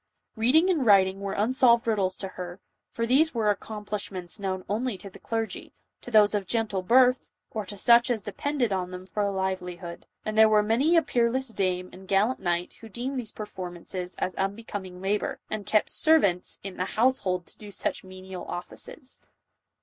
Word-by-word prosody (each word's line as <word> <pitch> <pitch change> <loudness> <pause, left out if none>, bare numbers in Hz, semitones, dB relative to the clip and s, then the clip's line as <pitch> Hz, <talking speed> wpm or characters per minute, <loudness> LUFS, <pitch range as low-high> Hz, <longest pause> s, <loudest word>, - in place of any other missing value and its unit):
Beading 255 +10 +4
and 315 -7 +1
writing 195 -3 +5
were 200 -1 -3
unsolved 235 +2 +4
riddles 195 -5 +1
to 195 - -5
her, 180 0 -7 0.3
for 230 - -2
these 275 +5 +3
were 215 -2 +3
accomplishments 205 -3 -4
known 190 -2 -3
only 220 +1 -1
to 195 0 -9
the - - -13
clergy, 225 -1 -4 0.3
to - - -9
those 215 -3 +5
of 200 -3 -1
gentle 220 -4 0
birth, 250 +5 +4 0.2
or 215 -3 -4
to 205 - -7
such 235 +4 +5
as 225 -5 -1
depended 270 -5 -1
on 180 -1 -2
them 185 0 -8
for 210 +2 -3
a 200 - +1
livelihood; 180 -2 -4 0.2
and 215 - -2
there 220 0 +7
were 210 -1 +4
many 265 +11 +3
a 330 - +5
peerless 255 0 +1
dame 185 -4 -1
and 190 +1 -12
gallant 205 +7 +2
knight, 175 -1 -1
who 225 - -10
deemed 255 +5 -3
these 230 -4 -6
performances 180 -3 -6
an 185 - -2
unbecoming 195 -2 -4
labor, 205 +2 -1
and 215 -2 -4
kept 215 - +2
servants 205 - +3
in 195 -1 -7
the 185 - -1
house 255 +3 +4
hold 180 -2 -2
to - - -16
do 210 - -10
such 200 - -2
menial 185 0 -9
offices. 255 - -7
205 Hz, 185 wpm, -27 LUFS, 185-235 Hz, 0.3 s, there